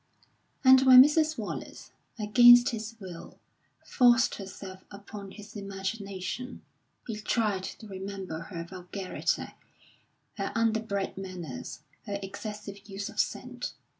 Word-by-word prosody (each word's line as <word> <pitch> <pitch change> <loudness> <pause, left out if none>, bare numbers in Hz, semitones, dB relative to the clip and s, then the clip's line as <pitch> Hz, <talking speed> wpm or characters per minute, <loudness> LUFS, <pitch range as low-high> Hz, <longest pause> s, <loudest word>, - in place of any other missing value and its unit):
And 260 0 +8
when 260 -1 +10
Mrs. 310 +2 +2
Wallace, - - -6 0.3
against 240 +3 +7
his 220 -1 -5
will, 180 -4 -10 0.5
forced 245 0 +4
herself 190 -1 -9
upon 200 0 -9
his 210 +2 -12
imagination, 200 +3 -5 0.4
he 225 -3 -5
tried 210 -3 0
to 215 +3 -9
remember 190 -3 -6
her 165 0 -6
vulgarity, 185 +2 -3 0.9
her - - -2
underbred 220 -4 0
manners, 185 -4 -7 0.3
her 200 -1 -2
excessive 205 0 -8
use 200 +1 -5
of - - -8
scent. - - -2
200 Hz, 110 wpm, -29 LUFS, 190-225 Hz, 0.9 s, when